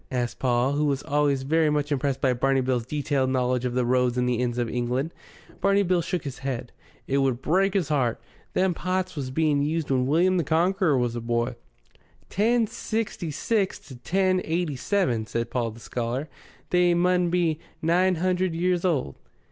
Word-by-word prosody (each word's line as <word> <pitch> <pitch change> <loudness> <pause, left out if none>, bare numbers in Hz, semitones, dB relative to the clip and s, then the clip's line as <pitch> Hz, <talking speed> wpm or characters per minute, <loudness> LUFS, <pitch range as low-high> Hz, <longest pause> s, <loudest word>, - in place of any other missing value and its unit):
asked 120 -2 -2
Paul, 125 +1 +2
who 145 +1 +1
was 140 -1 0
always 145 -2 +1
very 155 +3 +2
much 150 0 -1
impressed 140 -1 0
by 130 -2 +3
Barney 135 +2 +1
Bill's 125 -2 -1
detailed 140 -2 0
knowledge 125 -1 0
of 125 -1 -2
the 125 -1 +1
roads 125 0 +2
and 125 0 +1
the 120 -1 0
inns 120 -1 -1
of 120 -1 0
England. 125 +6 -2 0.5
Barney 200 0 +3
Bill 180 -2 +2
shook 170 +1 -3
his 135 -4 -6
head. 130 -3 -4 0.3
"It 135 +1 +1
would 135 -3 +1
break 190 +8 +1
'is 170 -6 0
'eart. 130 -6 +1 0.3
Them 185 -1 +2
pots 185 +1 -2
was 135 -4 -4
being 150 +1 +1
used 155 0 -1
when 130 -1 +2
William 180 +6 +3
the 170 - +1
Conqueror 165 +1 +2
was 120 -1 0
a 120 - -3
boy." 120 +1 -1 0.8
"Ten 230 +4 +2
sixty 220 -5 -3
six 195 - 0
to 140 -3 -13
ten 185 +9 +1
eighty 165 -2 -1
seven," 125 - 0
said 115 +1 -3
Paul 120 -2 0
the 110 +1 -11
scholar. 120 +5 -3 0.4
"They 180 -1 +4
mun 180 0 +2
be 170 -3 +1 0.2
nine 180 +3 +2
hundred 185 0 0
years 180 +1 +1
old." 150 - 0
145 Hz, 190 wpm, -25 LUFS, 125-180 Hz, 0.8 s, They